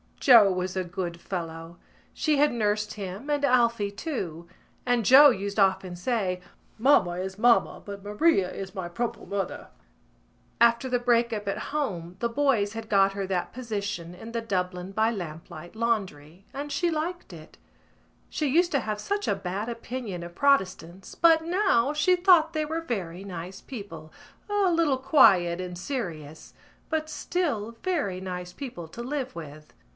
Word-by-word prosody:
Joe 230 Hz, -7 st, +7 dB
was 185 Hz, 0 st, -3 dB
a 185 Hz, -, 0 dB
good 175 Hz, -1 st, -5 dB
fellow. 165 Hz, -2 st, -6 dB, 0.4 s
She 305 Hz, -2 st, +1 dB
had 295 Hz, +1 st, +4 dB
nursed 210 Hz, -2 st, -1 dB
him 200 Hz, +5 st, -7 dB
and 290 Hz, -1 st, 0 dB
Alphy 235 Hz, -6 st, +2 dB
too; 175 Hz, -, -5 dB, 0.4 s
and 245 Hz, -3 st, +1 dB
Joe 285 Hz, +5 st, +9 dB
used 200 Hz, -3 st, -3 dB
often 190 Hz, -2 st, +2 dB
say: 185 Hz, -2 st, -1 dB, 0.4 s
"Mamma 215 Hz, -8 st, +3 dB
is 190 Hz, +1 st, -5 dB
mamma 235 Hz, +1 st, +3 dB
but 200 Hz, -1 st, -8 dB
Maria 205 Hz, -, +2 dB
is 195 Hz, +1 st, -7 dB
my 185 Hz, -2 st, -4 dB
proper 235 Hz, +7 st, -4 dB
mother." 195 Hz, -2 st, -4 dB, 0.9 s
After 235 Hz, +2 st, +4 dB
the 245 Hz, -1 st, +1 dB
break 235 Hz, -1 st, +2 dB
up 210 Hz, -2 st, -4 dB
at 195 Hz, -, -1 dB, 0.2 s
home 180 Hz, -, -3 dB
the 235 Hz, -, 0 dB
boys 230 Hz, -6 st, +1 dB
had 225 Hz, -1 st, -7 dB
got 195 Hz, -1 st, +4 dB
her 195 Hz, 0 st, -3 dB
that 185 Hz, -2 st, -2 dB
position 205 Hz, -7 st, -4 dB
in 225 Hz, +6 st, -10 dB
the 230 Hz, 0 st, -2 dB
Dublin 185 Hz, -3 st, -3 dB
by 220 Hz, +3 st, +2 dB
Lamplight 175 Hz, -3 st, -7 dB
laundry, 195 Hz, -7 st, -2 dB
and 285 Hz, +1 st, -5 dB
she 335 Hz, +5 st, 0 dB
liked 335 Hz, +3 st, -4 dB
it. -, -, -13 dB, 0.7 s
She 305 Hz, -, -1 dB
used 345 Hz, +6 st, +3 dB
to 280 Hz, -, +3 dB
have 215 Hz, -3 st, -3 dB
such 405 Hz, -, -2 dB
a -, -, +2 dB
bad 195 Hz, +4 st, -4 dB
opinion 230 Hz, -5 st, -5 dB
of 170 Hz, 0 st, -8 dB
Protestants 190 Hz, -9 st, 0 dB
but 325 Hz, -1 st, +5 dB
now 335 Hz, -, +2 dB
she 300 Hz, +5 st, +3 dB
thought 350 Hz, -3 st, +5 dB
they 310 Hz, -1 st, -1 dB
were 320 Hz, +2 st, -3 dB
very 190 Hz, -, -4 dB
nice 185 Hz, 0 st, -7 dB
people, 200 Hz, -10 st, -9 dB, 0.4 s
a 405 Hz, -3 st, +2 dB
little 330 Hz, -5 st, +2 dB
quiet 195 Hz, -, +4 dB
and 180 Hz, -1 st, -6 dB
serious, 170 Hz, -, -6 dB, 0.4 s
but 315 Hz, -1 st, -1 dB
still 290 Hz, -, -2 dB
very 290 Hz, -, -1 dB
nice 180 Hz, -1 st, -6 dB
people 235 Hz, -, -7 dB
to 230 Hz, +9 st, -9 dB
live 265 Hz, 0 st, -4 dB
with. 150 Hz, -2 st, -10 dB
215 Hz, 160 wpm, -26 LUFS, 185-275 Hz, 0.9 s, Joe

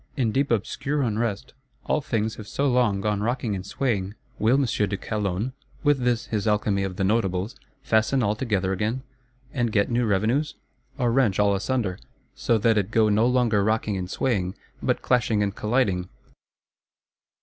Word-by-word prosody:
In 120 Hz, -5 st, +1 dB
deep 140 Hz, +4 st, +1 dB
obscure 135 Hz, +6 st, -1 dB
unrest, 115 Hz, 0 st, -2 dB, 0.3 s
all -, -, +1 dB
things 110 Hz, -4 st, -2 dB
have 105 Hz, -, -9 dB
so 140 Hz, +7 st, 0 dB
long 120 Hz, -6 st, +2 dB
gone 105 Hz, -1 st, 0 dB
rocking 120 Hz, -1 st, -1 dB
and 95 Hz, -, -5 dB
swaying: 100 Hz, -3 st, -2 dB, 0.2 s
will 115 Hz, +4 st, +4 dB
M. 140 Hz, -, +3 dB
de 105 Hz, -4 st, 0 dB
Calonne, 105 Hz, +4 st, -2 dB, 0.3 s
with 145 Hz, -2 st, +3 dB
this 120 Hz, -2 st, 0 dB
his 110 Hz, -1 st, -2 dB
alchemy 105 Hz, -2 st, +1 dB
of 95 Hz, -1 st, -3 dB
the 95 Hz, -, -1 dB
Notables, 100 Hz, +1 st, 0 dB, 0.3 s
fasten 115 Hz, +2 st, +2 dB
all 105 Hz, -1 st, +2 dB
together 100 Hz, -5 st, 0 dB
again, 110 Hz, +7 st, -2 dB, 0.5 s
and 120 Hz, -4 st, 0 dB
get 100 Hz, +1 st, +1 dB
new 120 Hz, 0 st, +1 dB
revenues? 115 Hz, +10 st, +1 dB, 0.4 s
Or 125 Hz, -4 st, +1 dB
wrench 115 Hz, -6 st, +2 dB
all 105 Hz, -1 st, +3 dB
asunder; 100 Hz, -2 st, -1 dB, 0.3 s
so 115 Hz, -, +1 dB
that 110 Hz, 0 st, +3 dB
it 100 Hz, -1 st, -2 dB
go 110 Hz, -1 st, +3 dB
no 110 Hz, +3 st, +3 dB
longer 120 Hz, -5 st, +2 dB
rocking 110 Hz, -1 st, 0 dB
and 90 Hz, -1 st, -4 dB
swaying, 95 Hz, -6 st, -1 dB, 0.3 s
but -, -, 0 dB
clashing 115 Hz, -4 st, +2 dB
and 100 Hz, 0 st, -2 dB
colliding? 105 Hz, -6 st, 0 dB
110 Hz, 170 wpm, -25 LUFS, 100-125 Hz, 0.5 s, will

